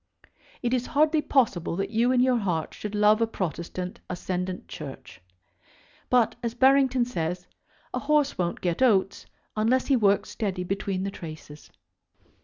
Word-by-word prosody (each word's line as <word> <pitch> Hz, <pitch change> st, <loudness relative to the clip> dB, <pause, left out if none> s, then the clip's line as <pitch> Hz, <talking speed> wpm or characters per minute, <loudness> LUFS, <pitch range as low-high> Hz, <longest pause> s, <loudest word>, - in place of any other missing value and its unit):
It 240 Hz, +1 st, 0 dB
is 250 Hz, -1 st, 0 dB
hardly 310 Hz, +1 st, +3 dB
possible 215 Hz, -, +1 dB
that 195 Hz, +2 st, -3 dB
you 235 Hz, +3 st, +2 dB
in 250 Hz, -1 st, +3 dB
your 255 Hz, -1 st, +3 dB
heart 175 Hz, -6 st, -2 dB
should 210 Hz, 0 st, -6 dB
love 210 Hz, +1 st, +4 dB
a 230 Hz, -, +3 dB
Protestant 180 Hz, -2 st, -4 dB
ascendant 180 Hz, +1 st, -4 dB
Church. 140 Hz, -, -9 dB, 0.9 s
But, 245 Hz, -3 st, +3 dB
as 235 Hz, -1 st, -3 dB
Barrington 265 Hz, -1 st, +4 dB
says, 180 Hz, -5 st, -3 dB, 0.5 s
a -, -, -1 dB
horse 295 Hz, -1 st, +2 dB
won't 175 Hz, -2 st, -2 dB
get 175 Hz, +2 st, -1 dB
oats 195 Hz, -6 st, +2 dB, 0.3 s
unless 230 Hz, +4 st, +2 dB
he 275 Hz, -, +3 dB
works 205 Hz, -4 st, +2 dB
steady 195 Hz, -5 st, -2 dB
between 190 Hz, 0 st, -2 dB
the 195 Hz, -, -3 dB
traces. 155 Hz, -4 st, -10 dB
210 Hz, 150 wpm, -26 LUFS, 180-250 Hz, 0.9 s, love